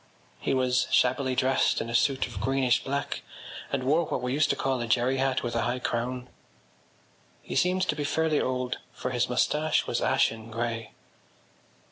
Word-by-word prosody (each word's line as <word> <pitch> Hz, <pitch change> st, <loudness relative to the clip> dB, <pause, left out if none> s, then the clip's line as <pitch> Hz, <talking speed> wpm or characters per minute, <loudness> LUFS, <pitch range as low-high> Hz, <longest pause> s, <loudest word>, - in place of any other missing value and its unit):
He -, -, 0 dB
was 130 Hz, -1 st, +2 dB
shabbily 130 Hz, +1 st, +2 dB
dressed 130 Hz, +1 st, +2 dB
in 115 Hz, -, -3 dB
a 115 Hz, -, -5 dB
suit 135 Hz, +3 st, +2 dB
of 125 Hz, -, -7 dB
greenish 130 Hz, -2 st, +2 dB
black 140 Hz, +1 st, -3 dB, 0.5 s
and 140 Hz, -2 st, -1 dB
wore 150 Hz, +6 st, +3 dB
what -, -, -3 dB
we 125 Hz, 0 st, -1 dB
used 145 Hz, +1 st, +2 dB
to -, -, +2 dB
call 130 Hz, -2 st, -1 dB
a 120 Hz, -, -3 dB
jerry 125 Hz, +3 st, +2 dB
hat 130 Hz, 0 st, 0 dB
with 120 Hz, -, -3 dB
a 115 Hz, -, +2 dB
high 120 Hz, +3 st, 0 dB
crown. 125 Hz, 0 st, -3 dB, 1.2 s
He -, -, -6 dB
seemed 185 Hz, +1 st, +2 dB
to -, -, 0 dB
be 145 Hz, -, -2 dB
fairly 155 Hz, +1 st, +1 dB
old 125 Hz, -1 st, -2 dB
for 125 Hz, -, -4 dB
his 120 Hz, -1 st, 0 dB
moustache 150 Hz, +5 st, +1 dB
was -, -, -1 dB
ashen 115 Hz, 0 st, +1 dB
grey. 115 Hz, -1 st, -3 dB
130 Hz, 180 wpm, -27 LUFS, 120-135 Hz, 1.2 s, wore